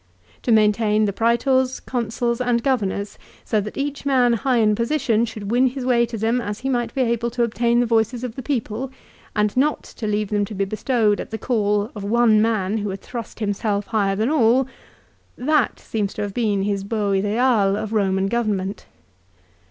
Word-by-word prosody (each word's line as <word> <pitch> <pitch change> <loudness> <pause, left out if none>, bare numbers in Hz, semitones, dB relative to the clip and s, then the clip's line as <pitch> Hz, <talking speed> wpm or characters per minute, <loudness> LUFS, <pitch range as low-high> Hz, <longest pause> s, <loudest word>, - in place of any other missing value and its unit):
To 245 - -1
maintain 215 0 +3
the 200 - -1
Praetors, 255 +4 +1
Consuls, 235 0 -2
and 240 -2 +1
Governors, 205 -6 -1 0.3
so 215 - +1
that 210 +1 -7
each 280 0 -3
man 255 -4 +3
high 250 +2 +1
in 215 -2 +4
position 235 -1 +1
should 215 -3 -6
win 250 +2 +4
his 255 0 -4
way 235 -2 +3
to 230 - -5
them 225 +3 +1
as 205 -2 -4
he 270 - -2
might 240 -3 0
be 270 - +1
able 235 -1 0
to 240 0 -1
obtain 235 +1 +1
the 245 - +3
voices 230 +1 +1
of 245 -3 -4
the 265 - -5
people, 250 -1 -3 0.5
and 210 -1 +1
not 290 +4 +1
to 220 - -7
leave 210 -1 -1
them 205 -1 +1
to 210 - -8
be 195 +1 0
bestowed 215 0 +1
at - - -6
the 220 - -4
call 210 -3 0
of 205 - -6
one 220 0 +4
man 220 -2 0
who 205 0 -3
had 190 0 -6
thrust 235 -3 -7
himself 205 -1 -1
higher 200 -3 0
than 220 +7 0
all, 255 -2 +4 0.7
that 290 -1 +1
seems 205 -3 -3
to 210 - -2
have 205 -1 -4
been 210 -4 0
his 200 -1 -1
beau 205 -1 -1
ideal 205 +1 +2
of 215 0 -4
Eoman 195 -3 +1
government. 205 -3 -2
225 Hz, 195 wpm, -22 LUFS, 210-245 Hz, 0.7 s, in